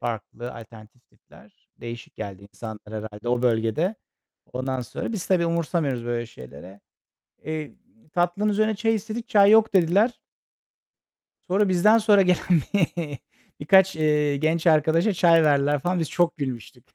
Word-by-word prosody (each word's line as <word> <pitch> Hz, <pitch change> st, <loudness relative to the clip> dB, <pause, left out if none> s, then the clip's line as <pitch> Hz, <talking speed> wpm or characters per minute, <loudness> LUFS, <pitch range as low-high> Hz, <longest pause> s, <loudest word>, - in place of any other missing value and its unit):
farklı, 120 Hz, +2 st, -6 dB
alternatif 115 Hz, +1 st, -15 dB
tipler. -, -, -23 dB
Değişik 120 Hz, 0 st, -9 dB
geldi 100 Hz, -2 st, -7 dB
insanlara 110 Hz, +1 st, -10 dB
herhâlde 110 Hz, +2 st, -7 dB
o 125 Hz, 0 st, 0 dB
bölgede. 120 Hz, -, 0 dB, 0.6 s
Ondan 130 Hz, 0 st, -3 dB
sonra 125 Hz, -, -6 dB
biz 195 Hz, -5 st, -5 dB
tabii 175 Hz, -3 st, +2 dB
umursamıyoruz 160 Hz, -7 st, -1 dB
böyle 120 Hz, -1 st, -3 dB
şeylere. 95 Hz, -, -13 dB, 0.6 s
Eee, 155 Hz, -2 st, -5 dB, 0.4 s
tatlının 175 Hz, +4 st, 0 dB
üzerine 215 Hz, +1 st, +1 dB
çay 225 Hz, 0 st, +1 dB
istedik. 220 Hz, +2 st, -5 dB
"Çay 200 Hz, -1 st, +5 dB
yok." 220 Hz, -1 st, +4 dB
dediler. 195 Hz, +7 st, +3 dB, 1.3 s
Sonra 200 Hz, +2 st, +2 dB
bizden 200 Hz, +5 st, +4 dB
sonra 210 Hz, -3 st, +4 dB
gelen 180 Hz, -3 st, +2 dB, 1.0 s
birkaç, 190 Hz, +4 st, +4 dB
eee, 150 Hz, -2 st, +1 dB
genç 160 Hz, +4 st, -1 dB
arkadaşa 160 Hz, +6 st, +3 dB
çay 165 Hz, -2 st, +4 dB
verdiler 145 Hz, 0 st, +2 dB
falan. 175 Hz, +5 st, -1 dB
Biz 160 Hz, -, -3 dB
çok 175 Hz, -1 st, +1 dB
gülmüştük. 130 Hz, -, -6 dB
155 Hz, 135 wpm, -24 LUFS, 120-190 Hz, 1.3 s, Çay